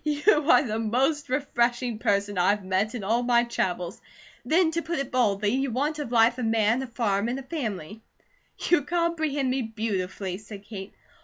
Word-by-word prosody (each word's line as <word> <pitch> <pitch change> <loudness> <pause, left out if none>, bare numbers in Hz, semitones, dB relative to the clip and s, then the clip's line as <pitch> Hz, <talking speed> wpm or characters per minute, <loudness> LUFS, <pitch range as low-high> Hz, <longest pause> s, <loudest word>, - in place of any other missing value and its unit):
"You 300 +1 +2
are - - +7
the 220 -4 -2
most 265 +7 0
refreshing 245 -3 0
person 200 -1 0
I 180 0 +3
have 205 -2 -11
met 190 +5 0
in 225 - -5
all 225 +5 +1
my 240 -1 +3
travels. 180 -6 -3 0.4
Then 320 +6 +3
to 335 +1 -1
put 335 +1 -3
it 275 -2 -3
baldly, 210 -5 +2
you 270 +4 0
want 290 +6 -1
of 285 -5 -4
life 235 +1 +4
a - - -2
man, 225 +2 +2
a 265 - -5
farm, 220 -3 0
and 250 - -2
a 270 - -6
family." 220 - -5 0.7
"You 350 -4 +4
comprehend 315 -5 0
me 265 +1 0
beautifully," 200 -4 -3
said 205 -1 -10
Kate. 200 -2 -8
235 Hz, 185 wpm, -26 LUFS, 210-275 Hz, 0.7 s, are